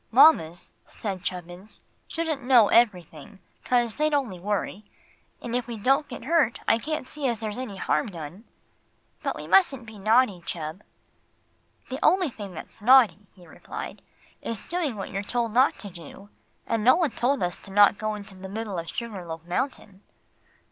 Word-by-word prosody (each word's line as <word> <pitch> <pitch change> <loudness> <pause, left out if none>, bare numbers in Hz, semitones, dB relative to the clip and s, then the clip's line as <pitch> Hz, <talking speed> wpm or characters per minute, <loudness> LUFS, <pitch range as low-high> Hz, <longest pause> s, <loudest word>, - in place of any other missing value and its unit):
"Mamas," 220 - +5
said 195 -4 -6
Chubbins, 180 +3 -6 0.3
"shouldn't 320 -4 -2
know 245 -5 +6
everything, 185 -6 +1 0.3
'cause 240 -3 +1
they'd 305 0 +2
only 235 -11 -2
worry. 205 +1 -2 0.6
And 240 0 -3
if 245 -1 -1
we 235 -2 -5
don't 270 +7 +2
get - - -8
hurt 300 -6 +2
I 225 - +4
can't 305 -1 -4
see 295 -3 -3
as 235 -3 -1
there's 215 +1 -4
any 225 -7 -6
harm - - 0
done." 175 +3 -9 0.8
"But - - -2
we - - -7
mustn't 275 -11 +3
be 220 -2 -11
naughty, 215 -2 +3
Chub." 160 +3 -5 1.1
"The 265 +2 -5
only 365 -1 +4
thing 200 -5 -9
that's 185 - -9
naughty," 225 -4 +5
he 180 -2 -17
replied, 160 - -8 0.4
"is 230 -3 -5
doing 330 -8 -1
what 195 -2 -6
you're 195 0 -2
told 230 +1 -2
not 255 +3 +4
to 200 - -8
do. 175 +3 -12 0.4
And 225 -2 -1
no 255 - +7
one 330 -4 +1
told 260 -2 0
us 175 +3 -3
not 205 +1 +7
to - - -14
go 215 0 -2
into 200 -1 -10
the 190 0 -9
middle 205 -3 -4
of 170 - -6
Sugar 225 -6 -5
Loaf 165 -1 -7
Mountain." 200 0 -3
215 Hz, 175 wpm, -26 LUFS, 190-255 Hz, 1.1 s, no